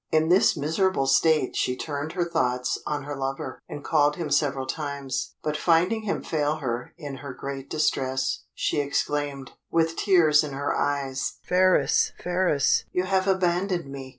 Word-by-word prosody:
In 160 +1 +3
this 180 -1 +4
miserable 160 +1 +1
state 155 +1 +3
she 125 - 0
turned 145 +2 -4
her 175 -1 -1
thoughts 125 -6 0
on 145 -2 -2
her 145 +1 -5
lover, 135 -1 -4
and 145 - -7
called 150 -2 +2
him 160 -3 -4
several 135 -3 +1
times; 140 -2 -4
but 150 -1 -1
finding 175 +8 +2
him 205 - -2
fail 150 -1 0
her 120 -5 -4
in 145 -5 -7
her 135 -2 -8
great 135 0 -6
distress, 130 -4 0
she - - 0
exclaimed, 145 -1 -2 0.2
with 165 0 +1
tears 165 -7 +4
in 145 -2 -5
her 140 +1 -1
eyes, 135 -2 -1
"Phratis! 180 -6 +3
Phratis! 175 -5 +2
you 180 - 0
have 190 0 +1
abandoned 180 -4 0
me!" 135 -1 -7
150 Hz, 160 wpm, -25 LUFS, 135-170 Hz, 0.2 s, this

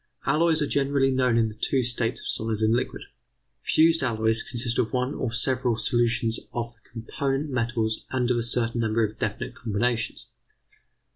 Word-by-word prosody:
Alloys 160 -1 +3
are - - -1
generally 140 -1 +2
known 125 -3 +2
in 115 -1 +3
the 110 - -6
two 130 +4 0
states 120 -1 0
of - - -11
solid 110 -1 -2
and 110 +1 +3
liquid. 120 - -2 0.6
Fused 165 0 +4
alloys 110 -2 +1
consist 120 -1 -2
of 115 - 0
one 125 +2 0
or 125 - -2
several 125 0 +2
solutions 115 -1 +1
of 120 0 -3
the 115 - -24
component 135 +5 -2
metals 115 -3 -1
and 125 -1 0
of 120 - +2
a - - +1
certain 115 0 -1
number 110 0 +1
of 105 +1 -8
definite 105 -1 -3
combinations. 115 +1 -2
120 Hz, 170 wpm, -26 LUFS, 115-130 Hz, 0.6 s, Fused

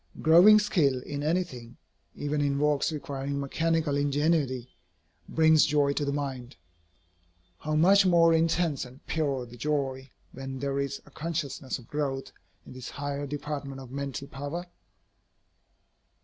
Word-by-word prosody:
Growing 175 +7 +7
skill 160 -11 +2
in 145 0 -5
anything, 145 -7 -2 0.4
even 145 0 -2
in 140 -1 +1
works 150 +1 +1
requiring 140 -2 -4
mechanical 160 +1 0
ingenuity, 145 -3 +1 0.6
brings 160 -1 +5
joy 145 -1 +2
to 145 - -1
the 140 - -1
mind. 135 -3 -4 1.0
How 155 0 -2
much 195 +6 +6
more 170 -3 +5
intense 165 -2 +1
and 130 +3 -13
pure 140 -5 -1
the 120 0 -13
joy, 135 -1 -2 0.2
when 135 0 -7
there 140 +1 -2
is 140 -1 -3
a - - -18
consciousness 150 -4 -4
of 125 - -15
growth 140 -3 -3 0.3
in - - -11
this 130 -1 -8
higher 145 0 -4
department 145 -1 -5
of 130 -2 -11
mental 140 0 -5
power? 145 +7 -5
145 Hz, 135 wpm, -28 LUFS, 135-160 Hz, 1.0 s, Growing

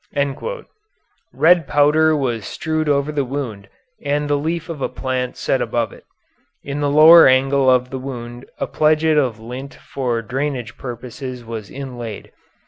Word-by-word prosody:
Red 170 -1 +4
powder 155 +2 +3
was 120 -6 -2
strewed 155 -1 -2
over 140 +1 +1
the 145 -2 0
wound 125 -7 -5 0.3
and 145 +1 0
the 145 - +1
leaf 160 +3 -2
of 165 -5 -7
a - - -1
plant 130 -1 -3
set 135 - 0
above 115 -3 -1
it. - - -16 0.6
In 140 +1 -4
the 145 -1 +1
lower 160 +3 +8
angle 135 +1 +3
of 125 0 +2
the 130 - -4
wound 120 -2 -7
a - - -2
pledget 155 0 +2
of 125 -6 -1
lint 125 +5 -8
for 120 -4 -3
drainage 125 -1 -3
purposes 125 0 -7
was 110 -3 -7
inlaid. 120 -6 -7
135 Hz, 150 wpm, -19 LUFS, 125-150 Hz, 0.6 s, lower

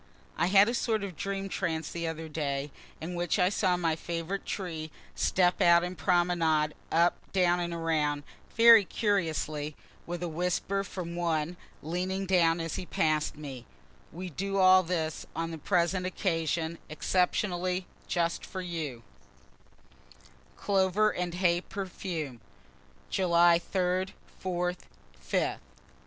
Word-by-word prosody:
(I 170 - +1
had 195 +2 +6
a 235 - 0
sort 225 -3 0
of 190 -4 -5
dream 195 +3 -3
trance 160 -4 -2
the 170 -1 -3
other 160 0 -4
day, 145 -2 -3 0.3
in 165 +3 -5
which 175 +2 0
I 180 -2 +4
saw 185 -3 +1
my 165 -2 +1
favorite 170 +4 -4
trees 165 -5 -4 0.2
step 180 -1 +2
out 170 0 +6
and 180 +1 -4
promenade 165 -2 +2 0.2
up, 170 +2 +3
down 180 -2 +3
and 175 -1 -2
around, 155 -3 0 0.3
very 230 -2 +9
curiously 160 -8 -1 0.3
with 175 0 -4
a - - -1
whisper 180 +4 -1
from 180 -3 -6
one, 170 -1 -1 0.3
leaning 185 +4 -2
down 175 -3 +3
as 165 -1 -3
he 185 - -4
pass'd 155 -1 0
me, 135 -5 -8 0.4
We 180 +2 -6
do 195 +5 -2
all 185 0 +7
this 165 -3 -3
on 165 0 -2
the 160 - -6
present 180 +2 +1
occasion, 165 -3 -1
exceptionally, 180 +2 0 0.2
just 170 -1 0
for 190 - -6
you.) 155 -9 -5 1.5
CLOVER 200 +1 +2
AND 175 -1 -3
HAY 175 -1 +2
PERFUME 170 - -5 0.7
_July 170 -2 +4
3d, 185 0 0 0.3
4th, 180 -1 -1 0.4
5th. 65 - 0
175 Hz, 135 wpm, -29 LUFS, 160-185 Hz, 1.5 s, very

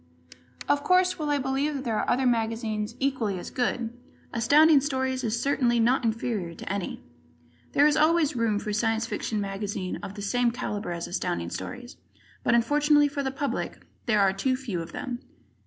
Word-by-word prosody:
Of 285 0 +2
course, 365 -1 +3
while 300 -1 -2
I 290 - +2
believe 275 +2 -1
that 270 - -4
there 225 -4 -1
are - - -1
other 260 +2 +2
magazines 225 -2 -1
equally 255 -8 0
as 175 - -7
good, 240 -2 -1 0.4
Astounding 290 +6 +5
Stories 260 -2 -1
is 230 0 0
certainly 245 -3 +2
not 245 +3 +3
inferior 220 -6 -2
to 190 - -5
any. 200 -3 -4 0.7
There 285 - +5
is 300 - +4
always 315 -2 +3
room 230 -3 +1
for 210 0 -3
a - - -2
Science 225 +1 +1
Fiction 220 -1 -3
magazine 195 -2 -3
of 195 - -8
the 205 - -6
same 245 +4 +2
caliber 215 -5 -4
as 170 0 -3
Astounding 85 - -2
Stories, 245 0 -7 0.5
but 235 - +3
unfortunately 290 +4 +4
for 285 0 -3
the 270 - -1
public 275 +1 -4 0.2
there 215 -3 +3
are 195 -1 +4
too 255 +7 0
few 230 -10 -4
of 165 - -8
them. 245 -3 -5
240 Hz, 185 wpm, -27 LUFS, 215-275 Hz, 0.7 s, Astounding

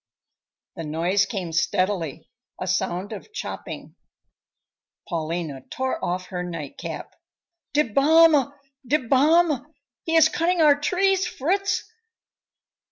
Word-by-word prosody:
The 165 - -4
noise 175 +6 +1
came 185 -5 -4
steadily, 170 -3 -1 0.3
a - - -3
sound 185 +2 -1
of 215 - -9
chopping. 430 - -7 1.1
Paulina 160 -4 -3
tore 260 0 -3
off 180 +1 -2
her 180 -1 -3
night 165 -5 -6
cap. - - -6 0.6
"Die 300 - +4
Bäume, 290 +3 +5 0.4
die 295 - +4
Bäume! 295 +3 +3 0.4
He 330 - 0
is 320 -1 +7
cutting 345 +2 0
our 305 -2 +7
trees, 380 +4 +2
Fritz!" 385 +6 0
240 Hz, 110 wpm, -24 LUFS, -, 1.1 s, is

